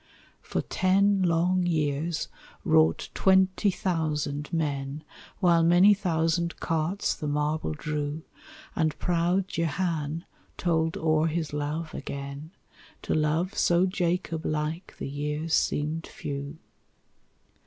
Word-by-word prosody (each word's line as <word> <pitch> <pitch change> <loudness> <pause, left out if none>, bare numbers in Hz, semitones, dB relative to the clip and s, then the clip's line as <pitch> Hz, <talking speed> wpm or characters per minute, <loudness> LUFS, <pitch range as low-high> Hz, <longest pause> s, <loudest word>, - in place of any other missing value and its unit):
For - - -2
ten 195 +1 +2
long 175 +1 +2
years 155 0 0 0.4
wrought 80 +1 +3
twenty 190 +1 +3
thousand 150 -5 -2
men, 145 -2 -2 0.3
While 170 -3 +4
many 175 +5 +6
thousand 170 -2 0
carts 165 +4 0
the 150 - -5
marble 150 - -1
drew; 150 - -3 0.5
And 155 -2 0
proud 180 +2 +1
Jehan 165 -1 -2 0.3
told 165 -2 +1
o'er 155 0 +2
his 160 -2 -2
love 150 +2 -3
again; 140 +2 -6 0.5
To - - -1
love 155 +5 +1
so 175 +1 +3
Jacob 175 -3 -1
like 155 +4 -3
the - - -4
years 150 +3 -3
seemed 155 +2 0
few. 140 +1 -6
160 Hz, 110 wpm, -27 LUFS, 150-175 Hz, 0.5 s, many